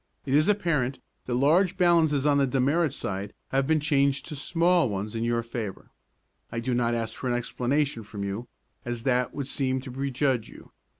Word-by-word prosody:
It 135 - -1
is 150 +3 +4
apparent 165 -11 +1 0.3
that 120 - 0
large 170 +8 +3
balances 165 -6 +3
on 145 -1 +4
the 135 - +3
demerit 140 +5 +2
side 100 -5 -5
have 135 0 +1
been 160 0 +3
changed 140 -2 +1
to 155 - -6
small 170 +1 +2
ones 105 +2 -4
in 115 - -1
your 115 0 0
favor. 115 -4 -6 0.6
I 115 - -2
do 125 +2 -1
not 120 -1 +1
ask 115 -1 -3
for 130 - -5
an 120 - +1
explanation 125 +2 -1
from 105 -1 -7
you, 100 +5 -4 0.4
as 120 -1 -4
that 125 -1 +1
would 140 - -3
seem 130 -1 -1
to 130 -1 -8
prejudge 135 -2 -1
you. - - -14
135 Hz, 190 wpm, -27 LUFS, 120-150 Hz, 0.6 s, is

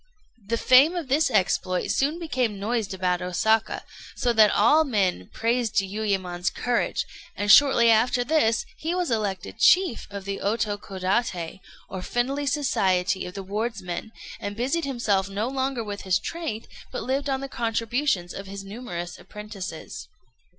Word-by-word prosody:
] 215 -5 -30
The 230 - +2
fame 270 +9 +6
of 330 -6 -4
this 300 +4 +3
exploit 185 -2 +1
soon 290 +4 +1
became 255 - -1
noised 220 0 -1
about 185 -1 0
Osaka, 220 +5 +1 0.3
so 240 -1 +1
that 215 -2 +6
all 265 +12 +5
men 195 - 0
praised 230 0 0
Jiuyémon's 190 -3 -1
courage; 245 +4 -1 0.3
and 205 0 +2
shortly 235 -2 +7
after 245 +3 +3
this 245 -6 +2
he 330 +1 -2
was 360 -6 -1
elected 195 - -2
chief 365 -10 +4
of 200 -1 -7
the 200 0 -3
Otokodaté, 200 -3 -1 0.3
or 190 - -6
friendly 270 +8 -1
society 190 -10 +1
of 180 - -10
the 195 - -5
wardsmen, 210 -1 -4 0.3
and 205 0 -5
busied 275 +8 -1
himself 210 -8 0
no 205 +4 -2
longer 265 -2 -1
with 205 -1 -6
his 190 -1 +2
trade, 230 0 -5 0.2
but - - -4
lived 275 +3 -1
on 265 -1 -1
the 275 - -4
contributions 230 -5 -1
of 195 0 -7
his 195 0 -7
numerous 195 -5 -6
apprentices. 210 -6 -8
220 Hz, 150 wpm, -25 LUFS, 195-255 Hz, 0.3 s, shortly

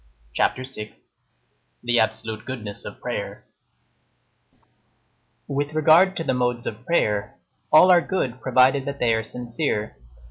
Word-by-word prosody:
CHAPTER 130 - 0
VI—THE 120 0 -7
ABSOLUTE 110 0 -2
GOODNESS 110 -6 -7
OF - - -9
PRAYER - - -5 2.0
With 145 +2 -3
regard 165 +5 +5
to 165 - -2
the 130 - 0
modes 125 -1 -1
of 115 +3 -7
prayer, 105 -12 0 0.3
all 180 +4 +7
are 175 -1 +6
good, 130 -10 -3
provided 130 +1 +3
that 140 0 -4
they 120 -4 +2
are 110 - +1
sincere. 120 0 -4
125 Hz, 120 wpm, -23 LUFS, 110-145 Hz, 2.0 s, all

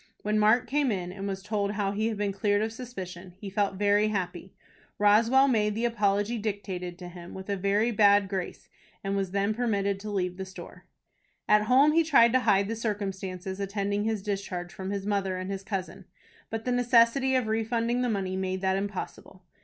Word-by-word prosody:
When 215 +1 +1
Mark 220 +4 +4
came 280 0 +1
in, 180 -3 -3
and 195 +1 -6
was 195 -1 -4
told 205 -1 -1
how 200 -2 -1
he 215 +2 -1
had 225 -2 -2
been 205 -1 -1
cleared 205 +1 +1
of 220 0 -3
suspicion, 185 -7 -8
he 195 0 -8
felt 200 0 0
very 205 +2 +3
happy. 185 -3 -4 0.4
Roswell 225 +6 +5
made 210 -5 +1
the 230 +2 -1
apology 210 0 +1
dictated 190 -4 -4
to 180 -1 -9
him, 175 -1 -10
with 190 +1 -6
a - - +1
very 200 +4 +1
bad 205 -2 +5
grace, 190 -2 -5 0.4
and 195 0 -2
then 200 +1 0
was - - -12
permitted 200 -4 0
to 210 +2 -7
leave 180 -3 -2
the 190 - -4
store. 190 - -12 0.6
At 210 0 +4
home 270 +6 +5
he 330 +2 +4
tried 250 -7 +5
to 255 - +5
hide 200 -5 +3
the 225 - -3
circumstances 195 -3 -4
attending 200 +1 -1
his 220 -3 -1
discharge 195 -4 -4
from 190 0 -6
his 200 -1 -3
mother 195 -2 -1
and 185 +1 -4
his 195 -1 -4
cousin; 195 -2 -5 0.4
but 225 0 -4
the 250 - 0
necessity 245 +2 +3
of 255 -2 +2
refunding 230 +2 0
the 250 - 0
money 190 -3 -2
made 190 0 -2
that 190 0 +1
impossible. 195 -1 -6
205 Hz, 200 wpm, -28 LUFS, 190-225 Hz, 0.6 s, Roswell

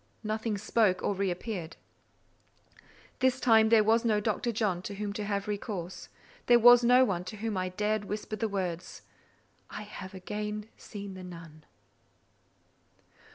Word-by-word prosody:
Nothing 215 0 -2
spoke 205 -2 +1
or - - +1
re 195 0 -1
appeared. 180 -2 -5 1.4
This 260 0 +2
time 220 -3 +5
there 220 -2 +6
was 225 +2 +3
no 220 -3 +2
Dr. 220 +3 -1
John 205 -5 -1
to 200 +2 -6
whom 205 0 -4
to 210 - -4
have 200 -1 -2
recourse: 200 -4 -5 0.4
there 240 - +7
was 245 +1 +8
no 250 +2 +6
one 180 -6 -2
to 215 - -7
whom 220 0 -3
I 185 0 -1
dared 210 +2 -1
whisper 210 +1 -4
the 220 +1 -2
words, 180 -3 -4 0.7
"I - - -7
have 190 -2 -9
again 210 +2 -5
seen 200 -2 -8
the 185 0 -9
nun." 165 -3 -11
210 Hz, 155 wpm, -29 LUFS, 190-220 Hz, 1.4 s, was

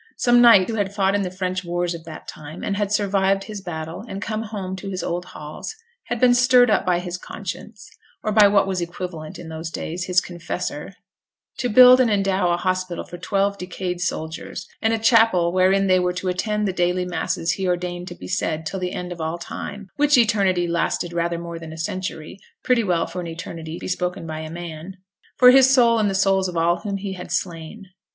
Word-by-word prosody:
Some 240 0 +4
knight 225 -6 +7
who 225 - -3
had 200 -1 -2
fought 195 -1 +2
in 205 - +1
the 185 - -2
French 185 0 -3
wars 175 0 -2
of 165 -1 -9
that 160 -1 -10
time, 155 +2 -9
and 200 - -1
had 205 -1 -1
survived 195 -2 +1
his 210 -1 -7
battles 165 +3 -6
and 195 - -5
come 215 +2 -3
home 200 -4 -5
to 195 +1 -6
his 185 -1 -4
old 175 +1 -3
halls, 155 - -8 0.3
had 240 - -3
been 245 0 +5
stirred 250 -1 +5
up 195 - +1
by 180 -1 +3
his 180 0 -5
conscience, 205 +2 -8 0.4
or 215 - -1
by 210 -1 +7
what 200 -1 +3
was 190 -2 -2
equivalent 170 -2 -6
in 170 - -9
those 160 +1 -5
days, 170 +2 -4
his 180 -1 +3
confessor, 175 -2 -5 0.6
to 245 - 0
build 250 +3 +8
and 250 -3 +4
endow 195 -3 +1
a 175 - +2
hospital 185 -1 -2
for 175 - -10
twelve 200 +2 0
decayed 180 0 -4
soldiers, 160 -2 -4
and 225 - +2
a 225 - +1
chapel 225 -6 +4
wherein 190 +2 +3
they 185 -1 +4
were 180 0 0
to 180 +1 -3
attend 210 +3 -1
the 190 - -1
daily 180 0 0
masses 175 -1 -1
he 190 -1 -2
ordained 180 0 -2
to - - -7
be 90 - -10
said 160 - -2
till 190 - -4
the 180 0 -3
end 180 0 -5
of 170 -2 -6
all 160 +2 -2
time 200 +3 -7
(which 290 -1 +4
eternity 200 -6 +2
lasted 170 0 -1
rather 170 0 -1
more 170 0 -6
than 165 -1 -9
a 160 - -9
century, 175 +1 -5 0.2
pretty 250 -2 +3
well 175 -4 +1
for 180 +2 -6
an 170 - -6
eternity 165 0 -7
bespoken 180 -1 -3
by 155 -1 -5
a 160 0 -6
man), 170 +2 -8 0.4
for 250 0 +8
his 265 0 +6
soul 235 -3 +5
and 210 -2 +2
the 195 - -2
souls 190 -1 +2
of 180 - -6
those 170 +1 +1
whom 200 -2 -3
he 195 0 -5
had 180 -1 -9
slain. 175 +4 -4
185 Hz, 215 wpm, -22 LUFS, 175-205 Hz, 0.6 s, build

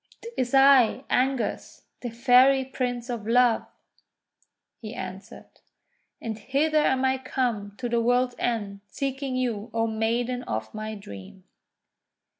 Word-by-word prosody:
'Tis 250 +1 0
I, 270 -2 +6
Angus, 260 0 -1 0.2
the 245 - -5
Fairy 255 +3 +4
Prince 245 -2 -3
of 235 -4 -5
Love," 240 -1 +3 1.1
he 220 +1 -8
answered. 190 +1 -8 0.7
"And 220 -2 -5
hither 305 +5 +1
am 265 -1 +2
I 260 0 +1
come 240 -6 -2
to 250 - -3
the 235 0 +1
world's 245 +1 +2
end, 205 -4 -2
seeking 270 -1 -3
you, 240 -3 -2
O 225 0 +2
Maiden 230 +3 -1
of 110 0 -4
my 215 0 -5
dream." 185 - -11
245 Hz, 125 wpm, -26 LUFS, 220-260 Hz, 1.1 s, I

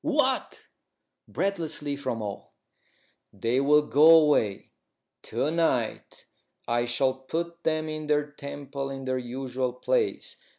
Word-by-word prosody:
"What?" 290 -4 0 0.6
breathlessly, 160 -7 -2
from 130 -5 -3
all. 100 -1 -7 0.8
"They 115 +6 0
will 150 +2 +5
go 150 +2 +5
away. 145 -10 +1 0.5
To 150 - -2
night 160 -9 -1 0.4
I 120 0 +1
shall 130 +2 +1
put 170 +6 -5
them 155 -1 0
in 155 -1 -5
their 150 -1 +2
temple 140 -1 -6
in 135 -1 -6
their 130 0 -1
usual 125 0 -3
place. 430 - -1
140 Hz, 120 wpm, -27 LUFS, 130-155 Hz, 0.8 s, will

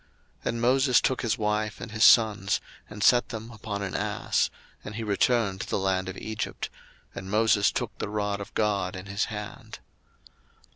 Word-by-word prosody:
02:004:020 - - -26
And 115 0 -2
Moses 130 +1 +4
took 130 - 0
his 115 0 0
wife 105 0 -1
and 110 - -7
his 110 0 +1
sons, 105 -5 +5 0.3
and 105 -1 -5
set 120 -1 +5
them 115 0 -7
upon 105 -2 -5
an 95 - -4
ass, - - 0 0.3
and 105 - -7
he 115 - -3
returned 105 -1 +1
to - - -6
the - - 0
land 95 -1 0
of 95 - -7
Egypt: 110 -1 -4 0.4
and 95 - -7
Moses 105 -1 +3
took - - -3
the - - -3
rod 105 -1 -2
of 100 - -8
God 100 -4 0
in 95 +1 -7
his 100 0 -1
hand. 105 -2 -7
105 Hz, 185 wpm, -27 LUFS, 100-115 Hz, 0.4 s, sons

